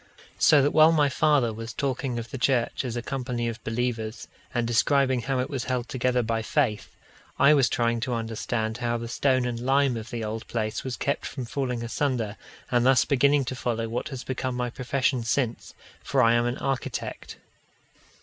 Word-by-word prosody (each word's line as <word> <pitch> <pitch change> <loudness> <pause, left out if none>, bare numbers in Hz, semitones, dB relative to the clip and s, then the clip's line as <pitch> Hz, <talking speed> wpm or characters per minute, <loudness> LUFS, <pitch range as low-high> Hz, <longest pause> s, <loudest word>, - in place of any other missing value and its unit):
So 150 -3 +6
that 145 - +2
while 155 +1 +6
my 150 -3 +3
father 140 -4 +2
was 115 +1 -7
talking 130 -2 -2
of 115 0 -6
the 135 - -5
church 125 -1 +1
as 125 -3 -4
a 120 - -3
company 125 -3 -3
of 115 0 -5
believers, 115 -1 -3 0.2
and 120 -2 0
describing 130 +2 +2
how 135 +2 -1
it 125 - 0
was 135 -4 -4
held 125 -1 -2
together 125 -1 +1
by 115 0 -1
faith, 110 -2 -1 0.4
I 140 +2 +6
was 135 -4 +4
trying 115 0 +1
to 120 +1 -2
understand 110 0 -2
how 120 -1 -1
the 115 0 -5
stone 130 +1 +1
and 120 -1 -3
lime 135 +1 +2
of 115 +1 -7
the 115 -1 -4
old 110 +1 -5
place 110 -2 -2
was 130 -3 -4
kept 140 - -1
from 130 -3 -5
falling 125 -1 -3
asunder, 115 -3 -1 0.4
and 120 -1 +3
thus 130 +1 +5
beginning 140 0 +3
to 130 - -4
follow 115 -2 -2
what 115 +5 -3
has 135 -4 -6
become 130 -1 -3
my 125 -1 -2
profession 130 0 0
since; 115 0 -2 0.3
for - - +2
I 115 0 +5
am 120 0 +2
an 120 - -2
architect. 135 -2 -4
125 Hz, 195 wpm, -26 LUFS, 115-135 Hz, 0.4 s, So